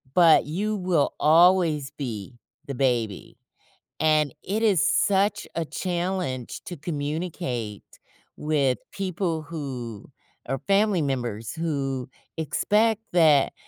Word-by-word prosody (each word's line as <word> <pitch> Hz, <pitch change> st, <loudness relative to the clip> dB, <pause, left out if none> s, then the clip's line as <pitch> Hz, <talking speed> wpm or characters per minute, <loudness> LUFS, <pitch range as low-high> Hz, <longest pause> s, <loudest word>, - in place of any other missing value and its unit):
But 170 Hz, -3 st, +6 dB
you 205 Hz, +8 st, -2 dB
will 180 Hz, -6 st, +1 dB
always 165 Hz, -3 st, +4 dB
be 115 Hz, -5 st, -5 dB, 0.3 s
the 140 Hz, -, -4 dB
baby, 120 Hz, -6 st, -1 dB, 0.6 s
and 155 Hz, -3 st, +2 dB
it 210 Hz, +4 st, -2 dB
is 200 Hz, -8 st, +4 dB
such 200 Hz, 0 st, +2 dB
a 165 Hz, -, -1 dB
challenge 175 Hz, -7 st, -3 dB
to 175 Hz, -, -7 dB
communicate 145 Hz, -, -4 dB, 0.5 s
with 145 Hz, -4 st, +1 dB
people 185 Hz, -4 st, -2 dB
who 130 Hz, -9 st, -6 dB, 0.4 s
are 135 Hz, +1 st, -2 dB
family 200 Hz, -2 st, +3 dB
members, 120 Hz, -6 st, -3 dB
who 135 Hz, -6 st, -2 dB, 0.3 s
expect 210 Hz, +8 st, +1 dB
that, 155 Hz, -5 st, +5 dB
155 Hz, 105 wpm, -25 LUFS, 135-180 Hz, 0.6 s, But